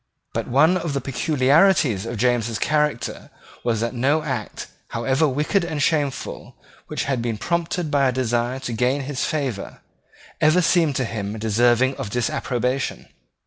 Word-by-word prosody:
But - - -2
one 155 +8 +4
of 165 -5 -3
the 140 - 0
peculiarities 135 - +2
of 115 0 -4
James's 120 -1 +1
character 150 -4 -1 0.3
was 115 -2 0
that 115 +1 -1
no 140 +6 +1
act, 130 -8 -4 0.2
however 130 +6 +1
wicked 150 +8 +1
and 160 -3 -3
shameful, 145 -2 -1 0.3
which - - -3
had 135 -4 -1
been 115 -2 -2
prompted 170 - -2
by 140 -2 +3
a - - +2
desire 120 0 0
to 120 -3 -4
gain 125 +5 +1
his 135 -1 -2
favour, 135 -10 -3 0.6
ever 160 +4 +4
seemed 165 -5 +3
to 130 - 0
him 105 -2 -4
deserving 120 +4 +2
of 105 - -4
disapprobation. 125 +3 -2
130 Hz, 150 wpm, -22 LUFS, 120-150 Hz, 0.6 s, one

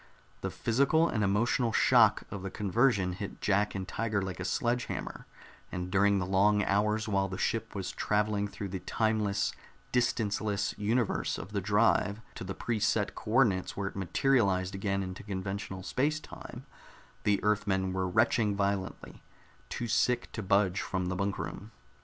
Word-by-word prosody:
The - - -2
physical 140 +8 +2
and 110 -8 0
emotional 115 +4 +2
shock - - +5
of 100 - -5
the 95 - -4
conversion 100 -1 +1
hit 100 +2 -6
Jack 100 +1 +1
and 95 -2 -4
Tiger 110 0 -1
like 95 -3 -4
a 90 - -3
sledge 120 +5 0
hammer, - - -6 0.4
and 90 0 -4
during 100 +1 +4
the 90 - -1
long 100 +2 +3
hours 105 +3 +1
while 100 -2 +1
the 95 - -5
ship 115 +1 -2
was 95 -2 -3
traveling 105 -1 0
through 100 0 -6
the 95 0 -4
time 110 +3 0
less, 105 -1 0 0.4
distance 115 -4 +1
less 105 -1 -1
universe 110 +2 0
of 95 - -8
the 100 -1 -1
drive 105 0 +2
to - - -7
the 95 +1 -5
pre 115 +2 -2
set - - +1
co - - -9
ordinates 110 -6 +2
where 100 -1 -1
it - - -16
materialized 95 -2 +1
again 100 0 -1
into 95 0 -6
conventional 95 -1 -5
space 150 +9 0
time, - - -10 0.6
the 100 -1 +2
Earthmen 100 -3 +1
were 95 0 0
retching 110 +1 +2
violently, 100 -1 -2 0.5
too 120 - -3
sick 120 +2 +1
to 115 - -5
budge 100 -1 +2
from 90 -1 -2
the 95 - -2
bunk 100 +1 -1
room. - - -6
100 Hz, 170 wpm, -30 LUFS, 95-110 Hz, 0.6 s, shock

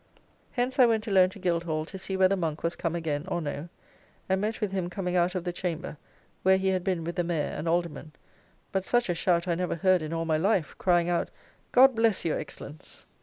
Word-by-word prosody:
Hence 255 +2 -1
I 250 - +8
went 220 -2 +1
alone 190 -4 +4
to 195 - -12
Guildhall 170 -4 -1
to 190 +3 -8
see 190 0 -3
whether 190 +1 +4
Monk 165 -4 -3
was 170 +1 0
come 170 -1 -2
again 155 -4 -2
or 175 -2 -1
no, 150 +1 -5 0.6
and 190 0 +1
met 215 +2 -2
with 210 -4 -1
him 185 -3 -2
coming 180 0 -3
out 180 +1 +2
of 180 - -2
the 175 -1 -3
chamber 175 -2 -4 0.5
where 190 0 +5
he 190 0 0
had 185 -1 0
been 180 -3 -1
with 170 +2 -5
the 175 - +2
Mayor 170 -3 -1
and 165 - -4
Aldermen, 170 -2 -1 0.6
but 190 -1 0
such 240 +2 +1
a - - +2
shout 170 +1 +1
I 175 - +2
never 180 +1 -1
heard 185 +1 +3
in 155 0 -5
all 165 0 -2
my 160 -1 +1
life, 190 -1 +1
crying 175 -2 +3
out, 175 -1 0 0.4
"God 265 +1 +7
bless 225 -5 +1
your 160 - 0
Excellence." 150 0 -9
180 Hz, 225 wpm, -28 LUFS, 165-190 Hz, 0.6 s, I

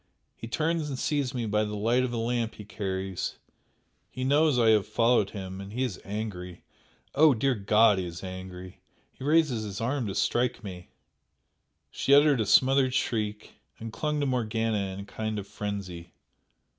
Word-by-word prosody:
he 115 - -8
turns 160 +4 -1
and 135 - -4
sees 140 -2 0
me 120 -2 -1
by 105 0 +1
the 105 0 -4
light 115 +5 +2
of 130 - -2
a 120 - -3
lamp 115 0 -1
he 105 - -10
carries; 95 -2 -4 0.7
he 130 - -5
knows 145 +1 +3
I 115 -2 +4
have 105 -3 +3
followed 115 -1 +2
him, 95 -2 -7
and 100 +1 -9
he 125 +4 -1
is 120 -8 -4
angry! 95 -4 -6 0.5
Oh, 150 -1 +6
dear 135 +4 +1
God, 105 -1 +4
he 90 - -3
is 85 +1 -8
angry 95 0 -8 0.3
he - - -12
raises 150 -6 +2
his 100 -2 -5
arm 125 +1 -1
to 95 - -4
strike 120 +2 0
me!" 90 -5 -8 1.0
She 140 - +3
uttered 145 -4 +5
a 105 - -1
smothered 130 +4 +4
shriek, 105 -4 -2 0.2
and 115 0 -7
clung 150 +2 -1
to - - +1
Morgana 110 -5 -1
in 95 +1 -6
a - - -9
kind 110 +1 -4
of 100 - -4
frenzy. 95 -5 -6
110 Hz, 180 wpm, -28 LUFS, 100-130 Hz, 1.0 s, Oh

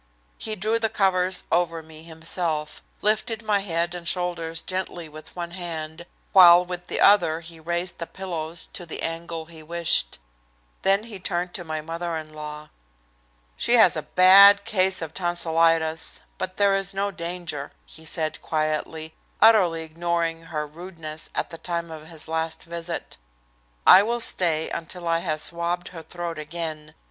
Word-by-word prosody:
He 215 - -2
drew 215 +4 0
the 225 -1 0
covers 185 -2 +1
over 165 -2 0
me 155 0 -12
himself, 160 -1 -3 0.2
lifted 220 +1 +1
my 210 -2 +1
head 170 -3 -2
and 175 -1 -7
shoulders 170 -2 -1
gently 185 -3 -4
with 155 0 -13
one 170 -1 -5
hand, 170 -2 -6 0.3
while 180 -1 +8
with 180 0 -7
the - - -2
other 170 -5 +4
he 165 -1 -9
raised 170 +2 -3
the 170 - -5
pillows 170 -3 -5
to 175 - -6
the - - -6
angle 165 0 -4
he 160 -1 -13
wished. 165 - +2 0.6
Then 195 +2 +2
he 220 -4 -8
turned 175 0 -2
to 175 - -2
my 155 -2 -4
mother 165 +2 -4
in 155 -1 -9
law. 150 0 -8 0.8
"She - - +3
has - - +7
a - - -2
bad 200 +2 +7
case 190 -3 +2
of 160 -1 -7
tonsilitis, 165 -2 +2 0.2
but 185 0 -4
there 200 -1 +4
is 195 0 +1
no 200 +1 -1
danger," 170 -5 -4
he 160 - -11
said 155 0 -2
quietly, 155 0 -3 0.3
utterly 185 -8 +5
ignoring 165 0 -2
her 155 -2 -4
rudeness 160 -1 -6
at - - -2
the 165 - -9
time 170 -1 -4
of 155 -1 -10
his 160 -2 -7
last 160 0 -3
visit. 170 - -6 0.7
"I 190 - +9
will 235 +3 -1
stay 165 -8 +3
until 170 +1 -5
I 165 0 +2
have 155 -3 -2
swabbed 170 +2 -2
her 165 -2 -9
throat 170 0 -6
again. 155 -1 -6
170 Hz, 160 wpm, -24 LUFS, 160-180 Hz, 0.8 s, I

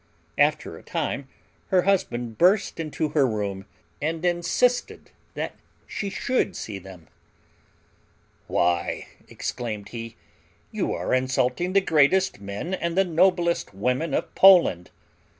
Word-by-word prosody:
After - - +1
a - - -16
time - - -3 0.4
her 185 -2 +3
husband 120 - -1
burst 190 +2 +3
into 155 -1 -2
her 145 -4 +3
room, 100 -3 -3 0.3
and 160 +3 -2
insisted 175 +8 0 0.2
that - - -3 0.3
she 200 - -4
should 200 0 -1
see 100 -3 -6
them. 90 -3 -13 1.4
"Why," 85 0 0 0.2
exclaimed 110 -4 -5
he, 115 -1 -7 0.6
"you - - -2
are - - -2
insulting 130 +6 0
the 195 - +5
greatest 160 - +3
men 100 - -5
and 170 -1 -2
the 195 - +4
noblest 170 - +1
women 125 +9 0
of - - -3
Poland! 170 - +6
155 Hz, 120 wpm, -25 LUFS, 110-180 Hz, 1.4 s, Poland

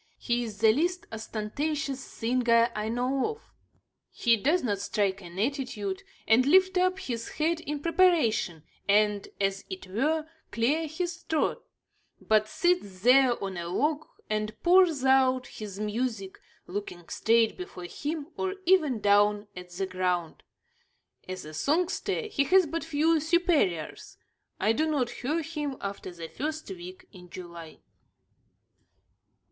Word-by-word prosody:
He 240 0 -1
is 220 -3 -7
the 220 -1 +7
least 350 +7 0
ostentatious 270 +7 -3
singer 235 -2 +1
I 215 +1 -2
know 255 - 0
of. 445 - -22 0.7
He 235 -2 +3
does 295 - +1
not 205 -5 0
strike 200 -1 -1
an 175 0 -11
attitude, 215 -5 -2 0.3
and 225 +3 +5
lift 375 +6 +4
up 370 +1 +2
his 240 -11 -4
head 325 +2 0
in 295 -2 -5
preparation, 315 - +2 0.3
and, 205 0 +3
as 195 -1 0
it 375 -1 -6
were, 300 +11 0 0.2
clear 290 +8 +1
his 340 +2 -3
throat; 315 -2 -1 0.6
but 215 -1 +2
sits 215 - 0
there 250 +1 +5
on 195 -2 -4
a 170 0 -4
log 295 - 0 0.2
and 215 0 -2
pours 345 -6 +5
out 260 -1 +4
his 205 -6 -8
music, 215 -2 -3 0.3
looking 180 -3 -6
straight 225 0 +2
before 360 - -8
him, 295 - -4
or 380 0 -2
even 310 - +3
down 205 +1 +3
at 180 0 -9
the 180 +2 -3
ground. 180 -3 -2 0.9
As 185 -3 -5
a 155 - -9
songster, 330 - 0
he 420 -10 0
has 370 +3 +5
but 330 +2 -3
few 320 +1 +2
superiors. 315 - 0 0.4
I 210 +3 +3
do 315 +7 0
not 260 -6 0
hear 305 +7 -2
him 295 -4 -4
after 200 -1 -5
the 170 -2 -8
first 310 - -4
week 180 0 -9
in 180 -1 -13
July. 170 -3 -10
245 Hz, 140 wpm, -28 LUFS, 200-315 Hz, 0.9 s, the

